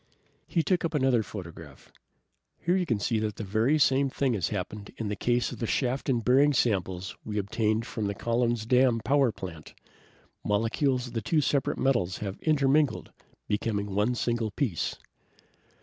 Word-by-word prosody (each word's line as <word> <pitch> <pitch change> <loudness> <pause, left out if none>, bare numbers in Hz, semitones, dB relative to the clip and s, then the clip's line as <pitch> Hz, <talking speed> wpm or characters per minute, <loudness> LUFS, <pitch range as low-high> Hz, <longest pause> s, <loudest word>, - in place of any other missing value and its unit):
He 165 - +1
took 180 +3 +1
up 165 -1 -2
another 130 -4 +3
photograph. 85 -9 -10 0.7
"Here 175 +2 0
you 180 -2 0
can 115 - +1
see 110 +2 0
that 105 -2 -2
the 110 +8 +1
same 135 -1 +3
thing 130 -1 0
has 95 -7 0
happened 100 +1 -5
in 110 -3 -3
the 105 - -2
case 120 +4 0
of - - -8
the 115 - -2
shaft 130 +3 -1
and 120 -4 0
bearing 140 +4 +5
samples 95 -6 0
we 105 -1 -4
obtained 110 +2 0
from 110 -4 -3
the 100 - -3
Collin's 120 0 0
Dam 125 -1 +3
power 135 -1 +3
plant. 80 -6 -9 0.7
Molecules 120 +5 +1
of 120 - -9
the 115 - -1
two 155 +9 +1
separate 140 -2 +1
pieces - - -7
of - - 0
metal 120 -10 +2
have 100 -2 -4
intermingled, 150 -1 +2 0.4
becoming 105 -1 -1
one 105 +5 +1
single 120 -2 -1
piece." 100 - -2
115 Hz, 175 wpm, -28 LUFS, 105-135 Hz, 0.7 s, bearing